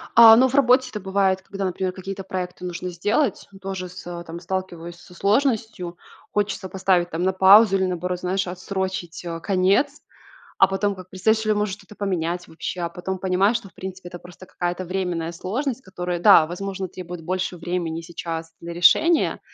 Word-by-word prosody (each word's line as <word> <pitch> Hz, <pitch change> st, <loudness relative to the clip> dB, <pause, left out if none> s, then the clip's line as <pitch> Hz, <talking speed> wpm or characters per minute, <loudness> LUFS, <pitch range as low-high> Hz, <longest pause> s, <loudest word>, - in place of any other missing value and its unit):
А, 225 Hz, -1 st, +10 dB
ну 255 Hz, +3 st, +5 dB
в 260 Hz, -, -3 dB
работе 260 Hz, -1 st, +4 dB
это 215 Hz, -, -5 dB
бывает, 190 Hz, -1 st, +1 dB
когда, 195 Hz, +1 st, -6 dB
например, 185 Hz, 0 st, -2 dB
какие-то 195 Hz, +1 st, -6 dB
проекты 180 Hz, -1 st, -5 dB
нужно 180 Hz, +1 st, -4 dB
сделать. 205 Hz, -, 0 dB
Тоже 190 Hz, -1 st, -4 dB
с 180 Hz, +1 st, -11 dB
э, 175 Hz, -1 st, -6 dB
там 170 Hz, +1 st, -7 dB
сталкиваюсь 175 Hz, -2 st, -5 dB
со 180 Hz, -, -16 dB
сложностью. 210 Hz, -3 st, 0 dB, 0.3 s
Хочется 205 Hz, -2 st, -1 dB
поставить 185 Hz, -2 st, +1 dB
там 165 Hz, +2 st, -2 dB
на 190 Hz, -, +3 dB
паузу 195 Hz, +2 st, +7 dB
или, 190 Hz, -, +1 dB
наоборот, 180 Hz, 0 st, -2 dB
знаешь, 185 Hz, +1 st, -1 dB
отсрочить, 185 Hz, -1 st, -4 dB
э, 165 Hz, -1 st, -5 dB
конец. 200 Hz, -, +1 dB, 0.6 s
А 195 Hz, -, +6 dB
потом 195 Hz, +1 st, 0 dB
как 185 Hz, -1 st, -12 dB
представишь 220 Hz, +4 st, +1 dB
или, 215 Hz, -, +2 dB
может, 210 Hz, -2 st, -1 dB
что-то 205 Hz, 0 st, -16 dB
поменять 175 Hz, -3 st, -2 dB
вообще, 175 Hz, +2 st, -5 dB
а 170 Hz, -, -1 dB
потом 180 Hz, +2 st, -5 dB
понимаешь, 190 Hz, +4 st, +2 dB
что 230 Hz, -4 st, -8 dB
в -, -, -26 dB
принципе 190 Hz, -1 st, -8 dB
это 175 Hz, -, -9 dB
просто 180 Hz, +1 st, -13 dB
какая-то 175 Hz, +1 st, -3 dB
временная 175 Hz, -2 st, -2 dB
сложность, 240 Hz, -, -3 dB
которая, 180 Hz, -3 st, -4 dB
да, 175 Hz, -4 st, +7 dB
возможно, 190 Hz, +3 st, -4 dB
требует 180 Hz, -1 st, -8 dB
больше 185 Hz, +1 st, -2 dB
времени 170 Hz, -1 st, -3 dB
сейчас 165 Hz, -1 st, -6 dB
для 170 Hz, 0 st, -7 dB
решения, 305 Hz, -, +4 dB
185 Hz, 180 wpm, -23 LUFS, 175-200 Hz, 0.6 s, А